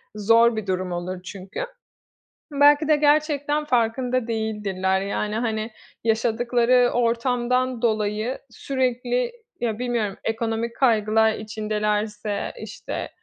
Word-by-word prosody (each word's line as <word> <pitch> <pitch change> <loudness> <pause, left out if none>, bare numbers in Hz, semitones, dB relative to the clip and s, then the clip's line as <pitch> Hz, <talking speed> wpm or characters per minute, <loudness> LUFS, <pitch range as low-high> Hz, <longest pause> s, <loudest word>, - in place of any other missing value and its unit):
zor 230 +2 +4
bir 215 -2 -4
durum 185 -1 -1
olur 180 +1 -4
çünkü. 190 0 -8 0.9
Belki 290 +1 +5
de 310 - +5
gerçekten 295 0 +2
farkında 245 -1 +1
değildirler, 210 -4 -1
yani, 210 +2 -2
hani, 220 -1 -2 0.3
yaşadıkları 240 +2 +2
ortamdan 245 +1 +1
dolayı 215 +1 0
sürekli, 250 - -1 0.3
ya, 225 -2 -1
bilmiyorum, 235 -5 -1
ekonomik 225 +1 -2
kaygılar 220 -3 +3
içindelerse, 210 -1 -2
işte, 215 -1 -6
225 Hz, 100 wpm, -23 LUFS, 210-250 Hz, 0.9 s, Belki